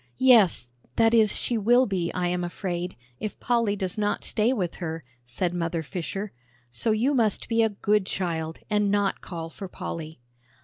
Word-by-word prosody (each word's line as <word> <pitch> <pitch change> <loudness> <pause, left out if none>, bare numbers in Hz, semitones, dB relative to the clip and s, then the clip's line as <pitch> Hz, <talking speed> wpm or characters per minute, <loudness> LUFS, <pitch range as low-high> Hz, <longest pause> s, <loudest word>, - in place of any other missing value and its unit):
"Yes, 230 - +5 0.3
that 225 0 +4
is, 220 -2 +4
she 235 -2 -1
will 240 +5 +5
be, 185 -5 -1
I 180 -1 0
am 180 0 0
afraid, 175 0 -3 0.2
if 215 - -5
Polly 230 -4 +1
does 190 0 -3
not 205 0 0
stay 220 +3 +1
with 185 -9 -2
her," 160 -2 -4 0.2
said 170 +9 -2
Mother 170 -1 -2
Fisher; 190 +6 -4 0.4
"so 175 - -1
you 230 +6 +2
must 225 -6 +1
be 230 0 +2
a 225 - +4
good 205 -1 +1
child, 165 -3 -2
and 210 -1 +2
not 200 -1 +1
call 165 -3 -6
for 190 +4 -8
Polly." 160 -3 -6
195 Hz, 175 wpm, -26 LUFS, 175-220 Hz, 0.4 s, Yes